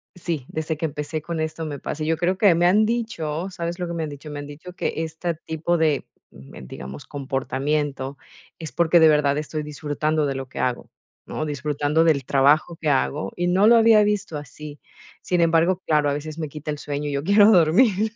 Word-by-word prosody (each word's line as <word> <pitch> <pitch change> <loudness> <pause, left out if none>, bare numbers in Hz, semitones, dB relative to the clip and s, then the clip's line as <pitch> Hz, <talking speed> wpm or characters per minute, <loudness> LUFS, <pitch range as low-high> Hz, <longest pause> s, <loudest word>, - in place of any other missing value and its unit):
Sí, 170 -6 -4
desde 160 0 -3
que 160 - -2
empecé 150 +1 -5
con 170 +1 -4
esto 160 +1 -3
me 145 -2 -5
pasa. 155 +3 -4
Yo 165 +1 +1
creo 180 +3 0
que 200 -6 +5
me 175 +1 +3
han 210 +4 +4
dicho, 190 -8 -2
¿sabes 175 -1 -5
lo 180 - -3
que 170 - -5
me 165 - -3
han - - -4
dicho? 145 +1 -9
Me 145 - -6
han 145 - -8
dicho 155 +5 -10
que - - -2
esta 160 +1 -3
tipo 160 +2 -2
de, 155 -3 +1 0.3
em, 65 -1 -12
digamos, 65 +3 -9
comportamiento 140 0 -2 0.4
es 160 -5 -7
porque 170 +3 +4
de 160 - +7
verdad 150 -1 +3
estoy 155 0 -4
disfrutando 150 0 -1
de 135 - -2
lo 135 -1 -6
que - - -9
hago, 125 -1 -2 0.4
¿no?, 155 - -4
disfrutando 145 +2 0
del 145 -5 +2
trabajo 145 +6 +3
que 155 - -2
hago. 145 +2 0
Y 175 0 -1
no 190 +4 +3
lo 235 - +7
había 225 -2 +6
visto 205 -5 -1
así. 145 +1 -10 0.4
Sin 180 -1 0
embargo, 170 +2 +3
claro, 150 -2 +2
a - - 0
veces 155 +2 -6
me 155 -2 -3
quita 150 +1 -6
el 150 - -4
sueño 145 0 -4
y 145 - -3
yo 140 - -1
quiero 205 +5 +6
dormir. 200 +4 +4
155 Hz, 215 wpm, -23 LUFS, 145-175 Hz, 0.4 s, de